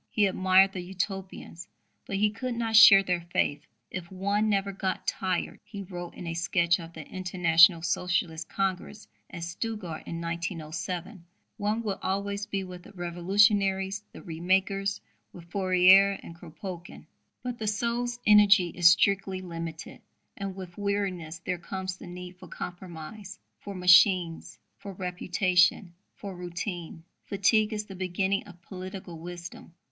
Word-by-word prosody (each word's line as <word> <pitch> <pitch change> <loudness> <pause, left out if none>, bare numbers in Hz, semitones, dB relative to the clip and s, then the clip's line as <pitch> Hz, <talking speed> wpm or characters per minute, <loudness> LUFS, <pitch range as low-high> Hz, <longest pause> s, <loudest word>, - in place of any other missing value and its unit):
He 210 - +2
admired 190 0 +4
the 185 - -5
Utopians, 190 -2 -5 0.4
but 195 - -3
he 210 +2 +2
could 250 +3 -4
not 225 -1 -1
share 200 -2 +10
their 180 -2 -1
faith. 145 -3 0 0.2
"If 185 0 -6
one 200 +3 0
never 200 -1 +1
got 190 -1 -3
tired," 185 -2 -2
he 205 -1 -8
wrote 175 -2 -8
in - - -8
a 165 - -3
sketch 170 +1 +1
of 165 0 -10
the 160 -3 -9
International 175 -2 +4
Socialist 170 -2 -1
Congress 190 -2 -3 0.2
at 170 - -7
Stuttgart 180 -1 -5
in 165 - -5
1907, 170 +2 -5 0.3
"one 210 +3 -1
would 200 -3 -3
always 200 +2 -2
be 195 -1 -2
with 180 -1 -9
the 205 - -15
revolutionaries, 195 +2 +2
the - - -12
re 165 -3 -7
makers, 195 +3 +1 0.3
with 170 -1 -13
Fourier 190 +1 +5
and - - -9
Kropotkin. 175 +2 -9 0.4
But 245 -1 -5
the 215 - -3
soul's 240 +3 -1
energy 205 -4 +6
is 170 0 +5
strictly 190 +1 +2
limited; 165 -3 -7 0.3
and 195 -1 -5
with 185 -1 -9
weariness 195 -5 -2
there 180 -1 -2
comes 185 +1 -5
the - - -11
need 180 0 -9
for - - -12
compromise, 180 +3 -8 0.2
for 200 - -8
'machines,' 180 -2 +4 0.2
for 200 - -8
reputation, 180 0 +1 0.2
for 200 -2 -8
routine. 175 -1 -6 0.2
Fatigue 210 +2 +2
is 210 -1 -3
the 195 - -10
beginning 190 +1 -1
of 180 -3 -14
political 185 -2 -8
wisdom." 175 0 -9
185 Hz, 145 wpm, -28 LUFS, 175-200 Hz, 0.4 s, share